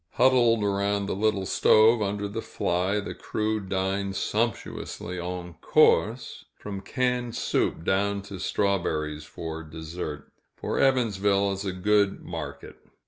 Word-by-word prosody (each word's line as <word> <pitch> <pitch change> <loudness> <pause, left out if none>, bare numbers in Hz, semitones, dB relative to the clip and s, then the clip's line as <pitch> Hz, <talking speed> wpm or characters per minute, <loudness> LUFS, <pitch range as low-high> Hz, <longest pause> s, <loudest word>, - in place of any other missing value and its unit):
Huddled 120 -3 +4
around 100 0 0
the 100 - -2
little 100 -1 +1
stove, 110 +4 +5
under 100 0 -1
the 110 +3 -4
fly, 95 -2 0
the 100 - -5
crew 110 0 -2
dined 95 0 -2
sumptuously 105 -5 -2
en 90 0 -5
course, - - +3
from 100 -2 -7
canned 125 +1 -1
soup - - 0
down 100 +2 +1
to 100 -1 -8
strawberries 80 -7 -1
for 80 -1 -6
dessert, 80 -1 -7 0.2
for - - -3
Evansville 100 -6 +2
is 95 +1 -4
a 95 - -1
good 100 +2 +1
market. - - -7
100 Hz, 130 wpm, -26 LUFS, 90-110 Hz, 0.2 s, stove